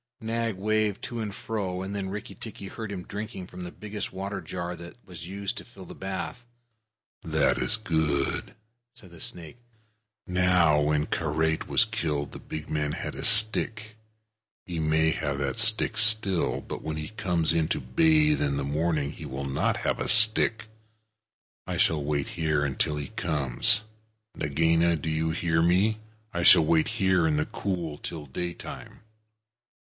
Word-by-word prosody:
Nag 115 -1 -2
waved 105 +1 0
to 120 - -5
and 105 -3 -3
fro, 100 -4 -3
and 95 +2 -5
then 95 -2 -3
Rikki 105 +2 -6
tikki 105 -3 -8
heard 110 +1 -6
him 95 -3 -5
drinking 105 -2 -6
from 90 -1 -9
the 90 - -6
biggest 105 -2 -6
water 100 +2 -4
jar 85 +1 -5
that 85 +5 -11
was 85 -2 -9
used 100 +1 -4
to - - -7
fill - - -13
the - - -10
bath. 95 +5 -5 0.8
"That 80 -5 +2
is - - +2
good," 80 -9 -1 0.4
said 100 -8 -16
the 85 - -13
snake. 85 +5 -7 0.7
"Now, 90 -4 +4
when 75 0 +1
Karait 80 0 0
was 115 - +4
killed, 80 -10 -2
the - - -9
big 80 -1 -7
man 75 -1 -1
had 90 - -5
a 135 - -6
stick. 110 0 +4 0.7
He 85 -2 -4
may 80 0 +2
have 75 -3 -2
that 70 +8 -2
stick 110 -1 +3
still, 110 -5 +4
but - - -7
when 80 0 -3
he 75 +2 -5
comes 90 -7 +1
in 80 -2 +1
to - - 0
bathe 155 -2 +3
in 70 -1 0
the 70 - -1
morning 75 0 0
he 80 - -9
will 70 0 -5
not 70 0 0
have - - -1
a - - -2
stick. 110 +1 +3 1.0
I - - -2
shall 75 -3 +2
wait 70 -1 -1
here 75 -3 0
till 75 - 0
he 70 -2 -5
comes. 80 - +1 0.5
Nagaina 80 +3 +2
do 80 +1 -4
you 80 +1 0
hear 80 0 +1
me? 95 +6 +3 0.3
I 85 - -2
shall 80 - +8
wait 80 0 +3
here 95 -4 +3
in 75 -1 +1
the 75 - +1
cool 85 -6 -3
till 80 -3 -6
daytime." 85 +6 -7
85 Hz, 170 wpm, -27 LUFS, 80-105 Hz, 1.0 s, shall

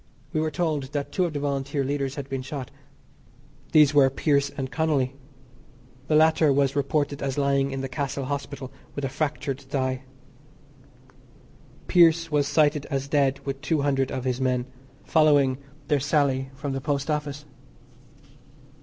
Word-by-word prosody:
We 155 - +1
were 155 - 0
told 150 -4 -2
that 145 -1 -3
two 185 - +1
of 170 - -3
the 145 - -2
Volunteer 140 0 -1
leaders 140 0 -2
had 140 -2 -5
been 135 -1 -3
shot. 135 -1 -6 1.0
These 150 -2 +6
were 140 -2 +6
Pearse 140 +1 +1
and 135 -2 -5
Connolly. 145 -5 0 0.9
The 155 - +2
latter 160 -1 +5
was 140 -1 +2
reported 145 0 0
as 135 -1 -2
lying 140 -1 +2
in 135 -1 -4
the 135 - -3
Castle 135 0 -3
Hospital 140 -1 -5 0.2
with 140 - -2
a - - -2
fractured 140 -1 -2
thigh. 130 -1 -2 1.9
Pearse 165 -2 +4
was 145 -1 +2
cited 150 -1 +2
as 135 -1 -2
dead 140 -2 +1
with 135 0 -4
two 155 -1 0
hundred 135 -2 +1
of 130 -2 -3
his 130 0 -1
men, 125 -1 +1 0.4
following 145 -5 +3 0.3
their 145 0 +2
sally 135 -2 +1
from 140 0 -4
the 135 - -3
Post 145 +1 -1
Office. 150 -1 -3
140 Hz, 155 wpm, -25 LUFS, 135-150 Hz, 1.9 s, These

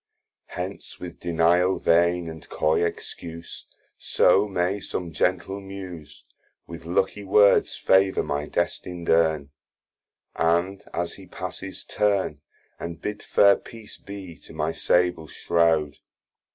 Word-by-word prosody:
Hence - - -6
with 85 -2 -8
denial 85 +2 +3
vain, 85 +1 +3
and 80 -1 -9
coy 80 +2 +1
excuse, 85 0 -6 0.3
So 100 +4 +4
may 95 +1 0
som 90 -3 -4
gentle 95 +5 0
Muse 90 -6 -9 0.4
With 85 -1 -10
lucky 95 +3 0
words 100 +1 +4
favour 95 0 +3
my 75 +1 -2
destin'd 85 -2 -3
Urn, 80 -4 +2 0.8
And 85 +4 +1
as 85 0 -2
he 95 -2 -12
passes 95 +2 -6
turn, 100 -8 0 0.4
And 85 -1 -6
bid 105 0 -4
fair 100 -1 +5
peace 115 -2 -11
be 95 -4 -9
to - - -13
my 80 +1 -1
sable 90 -2 +1
shrowd. 80 -2 +1
85 Hz, 120 wpm, -25 LUFS, 80-95 Hz, 0.8 s, fair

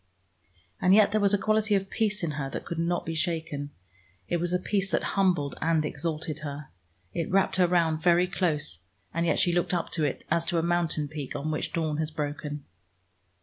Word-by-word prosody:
And 185 +2 +6
yet 210 -1 +6
there 215 0 +2
was 200 -1 +4
a - - +1
quality 215 +1 +2
of 195 0 -1
peace 210 -3 0
in 165 - 0
her 145 -2 -3
that - - -5
could 170 - -4
not 170 +1 0
be 165 - -3
shaken. 160 -4 -2 0.6
It 175 - +1
was 175 +1 -1
a 180 - +3
peace 195 +1 0
that - - +1
humbled 180 -9 +2
and 160 -1 +2
exalted 155 +1 -3
her. 145 -1 -6 0.4
It 165 -2 -2
wrapped 195 0 +2
her 180 -1 +5
round 165 -3 +2
very 175 +1 +5
close, 155 - -1 0.3
and 170 +1 0
yet - - +2
she 175 - +2
looked 175 +1 +1
up 170 - -2
to 160 - 0
it, 145 - -2
as 170 +1 +3
to 175 -1 0
a 165 - +2
mountain 170 -3 +1
peak 145 -2 -6
on 145 +2 -2
which 155 - -2
dawn 155 -3 -1
has 155 -1 -1
broken. 150 -1 -4
165 Hz, 210 wpm, -28 LUFS, 150-180 Hz, 0.6 s, And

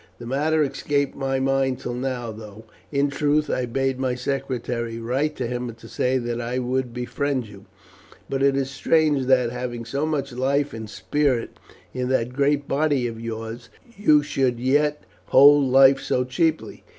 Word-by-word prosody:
The 120 - -10
matter 150 +5 +1
escaped 140 0 -1
my 135 -1 -1
mind 135 -1 +1
till 125 - -5
now, 125 -2 -3
though, 110 0 -11 0.3
in 140 0 +1
truth, 150 +1 +1
I 125 - -1
bade 135 +2 -1
my 130 -2 0
secretary 125 -3 -3
write 130 +7 -1
to 125 - -3
him 125 0 -3
to 115 - -14
say 130 +1 0
that 120 -1 -3
I 120 +2 -3
would 130 0 -1
befriend 125 +2 -2
you. 100 -2 -14 0.6
But 135 0 -2
it 135 0 +3
is 135 0 -1
strange 150 -2 +2
that, 125 -3 +3
having 120 -1 -5
so 140 +6 -2
much 140 -3 -2
life 140 +3 0
and 110 -1 -7
spirit 135 0 -1 0.3
in 125 0 -2
that 125 -2 0
great 140 +1 +1
body 145 -3 +1
of 115 -1 -5
yours, 115 +1 -6 0.3
you 155 -7 +4
should 130 -4 0
yet 145 +4 +1 0.2
hold 145 +1 +7
life 135 +1 +6
so 125 - 0
cheaply. 155 +5 -1
130 Hz, 170 wpm, -23 LUFS, 120-140 Hz, 0.6 s, hold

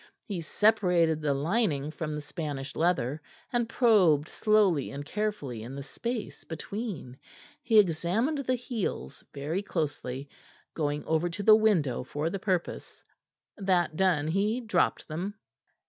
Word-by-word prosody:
He 195 -6 -4
separated 175 -4 +3
the 145 -2 +1
lining 155 -2 0
from 155 -1 -4
the 150 - -4
Spanish 145 -3 -5
leather, 160 -4 +1 0.3
and 240 -1 +1
probed 185 - +4
slowly 205 -9 +3
and 140 +1 -6
carefully 190 - -3
in 120 +4 -7
the 140 - -5
space 230 - -5
between. 165 - -6 0.4
He 225 -2 +3
examined 205 - +2
the 255 -2 0
heels 230 - -4
very 150 +7 -2
closely, 145 -7 -3 0.5
going 150 -2 -2
over 160 +2 +1
to 200 +4 -5
the 215 +1 +8
window 185 - +2
for 150 +5 -3
the 195 - -3
purpose. 185 -3 -3 0.5
That 185 -6 +1
done, 175 -5 +2
he 205 +7 +1
dropped 210 -8 0
them. 180 +6 -4
170 Hz, 135 wpm, -29 LUFS, 145-210 Hz, 0.5 s, the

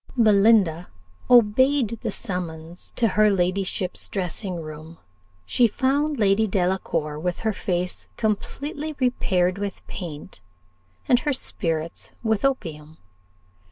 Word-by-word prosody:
Belinda 205 -6 +4 0.4
obeyed 240 0 +4
the - - -2
summons 175 -4 -5
to 230 -2 +2
her 215 +2 +4
ladyship's 185 0 -1
dressing 185 0 -3
room: 155 +1 -9 0.5
she 240 - +3
found 285 +6 0
Lady 210 0 +3
Delacour 175 -5 -1
with 175 +2 -2
her 220 -1 0
face 180 -1 -3
completely 285 +8 -2
repaired 190 -7 +1
with 200 -1 -5
paint, 150 - -8 0.7
and 245 - +5
her 295 0 0
spirits 165 -9 -2
with 220 -2 +1
opium. 160 - -2
195 Hz, 110 wpm, -24 LUFS, 175-230 Hz, 0.7 s, and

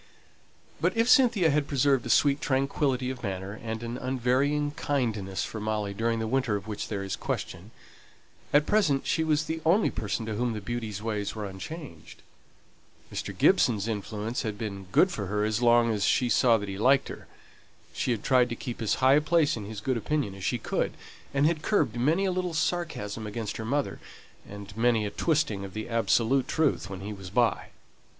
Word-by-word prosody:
But - - 0
if 230 +1 +3
Cynthia 230 - +5
had 145 0 +1
preserved 135 -2 +2
a - - -5
sweet 140 +3 +3
tranquillity 135 -1 0
of 130 -2 -8
manner 100 0 -5
and 110 0 -5
an 120 +1 -4
unvarying 130 +4 +1
kindness 110 -11 -2
for 110 - -5
Molly 105 -1 -2
during 115 +2 0
the 110 - -2
winter 120 -2 0
of 100 -1 -4
which 105 -1 -5
there 100 -2 -3
is 95 - -3
question, 90 +6 -5 0.8
at 145 +1 +4
present 155 -10 +2
she 160 - +1
was 155 -1 +2
the 160 +1 -4
only 180 +7 +3
person 110 +1 -3
to 110 - -3
whom 120 +2 -1
the 110 - -4
beauty's 110 -1 -5
ways 105 -2 -2
were 105 -1 -4
unchanged. 95 - -9 0.9
Mr. - - -5
Gibson's 110 -3 +3
influence 110 +1 -3
had 110 -3 -4
been 100 -3 -6
good 185 - +4
for 100 - -4
her 105 +2 0
as 110 +2 -1
long 120 -1 +4
as 105 -2 -1
she 125 +3 +2
saw 120 -1 +4
that 105 -1 -5
he 95 0 -5
liked 135 +5 +4
her; - - -9 0.7
she - - -2
had 115 -4 -1
tried 125 -2 +3
to 120 - -3
keep 120 0 -6
as 110 - +1
high 130 - +7
a - - +3
place 155 -1 +2
in 110 -3 -6
his 105 -1 -7
good 130 +2 0
opinion 130 -3 -1
as 95 -1 -10
she - - 0
could, - - -2 0.4
and 140 +1 +2
had 155 -1 +1
curbed 150 - +1
many 155 +11 +2
a 190 - +1
little 180 -2 -2
sarcasm 155 - -2
against 105 -1 -4
her 110 - -5
mother, 140 +4 -1 0.5
and 100 -1 -9
many 115 -1 +2
a 100 - -3
twisting 115 -7 0
of 95 0 -9
the 110 - -4
absolute 115 +3 +2
truth 150 -9 0
when 95 -1 -7
he 105 +2 -5
was 95 -2 -9
by. 115 0 +1
115 Hz, 200 wpm, -28 LUFS, 105-145 Hz, 0.9 s, high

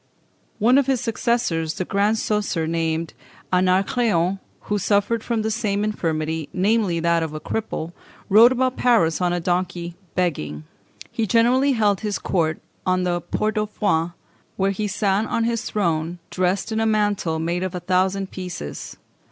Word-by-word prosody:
One 245 +5 +5
of 280 - 0
his 265 -2 +2
successors, 225 -9 0
the 185 - -3
Grand 205 +3 +1
Coesre 210 -1 0
surnamed 165 -2 -1 0.4
Anacréon, 185 0 +2 0.2
who 205 0 -2
suffered 205 +4 +1
from 230 -2 -1
the 220 - -1
same 210 -2 -1
infirmity, 160 -6 -2
namely, 195 -2 +1
that 170 0 +2
of 160 -1 -3
a - - -4
cripple, 175 -4 -4 0.3
rode 225 +5 +7
about 255 0 0
Paris 200 -10 +3
on 180 -1 +2
a 175 - 0
donkey 175 0 -2 0.2
begging. 75 - -1 0.5
He 225 -2 -1
generally 250 +6 +3
held 205 -5 +2
his 210 -2 -2
court 160 -4 0 0.2
on 185 0 +1
the 175 -1 0
Port 215 0 -1
au 210 - -1
Foin, 175 -5 0 0.4
where 195 0 +2
he 210 +2 -2
sat 205 +1 0
on 230 - 0
his 230 0 -1
throne 170 -4 -1
dressed 185 +4 0
in 220 - 0
a 225 - +2
mantle 205 -6 +1
made 170 +2 -1
of 185 0 -3
a - - -2
thousand 190 +2 0
pieces. 180 - -6
190 Hz, 160 wpm, -22 LUFS, 170-220 Hz, 0.5 s, rode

